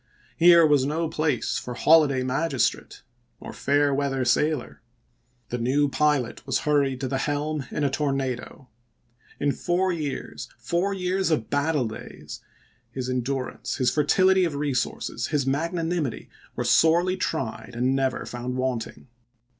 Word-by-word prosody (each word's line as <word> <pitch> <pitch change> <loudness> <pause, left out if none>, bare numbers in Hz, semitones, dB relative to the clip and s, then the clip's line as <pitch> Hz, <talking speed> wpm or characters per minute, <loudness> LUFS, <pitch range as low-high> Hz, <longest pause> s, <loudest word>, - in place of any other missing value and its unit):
Here 170 -1 +7
was 145 -3 +4
no 160 +4 -1
place 155 -5 -1
for 125 - -7
holiday 145 -3 +4
magistrate, 135 +1 -1 0.4
nor - - -9
fair 145 0 +1
weather 135 -2 -1
sailor; 150 +3 0 0.7
the 120 - -3
new 140 +5 +2
pilot 145 -6 0
was 135 - 0
hurried 140 -3 +2
to 135 - -1
the 135 0 -2
helm 145 -1 -2
in 150 - -3
a 140 - +2
tornado. 135 -2 -3 0.7
In 145 0 +1
four 180 +5 0
years 150 -5 -5
— - - -40
four 180 +4 +1
years 190 -1 -1
of 150 -9 -1
battle 145 -3 +1
days 110 - -9 0.3
— - - -39
his 130 -1 -3
endurance, 130 +1 -3
his 125 -3 +1
fertility 185 +6 +3
of 165 -5 -1
resources, 130 -3 -2
his 145 -4 0
magnanimity, 165 0 -2 0.2
were - - -2
sorely 175 +3 +3
tried 135 -9 -3
and 125 +3 +1
never 135 -1 -1
found 125 +1 -5
wanting. 130 -3 -3
145 Hz, 145 wpm, -25 LUFS, 130-160 Hz, 0.7 s, Here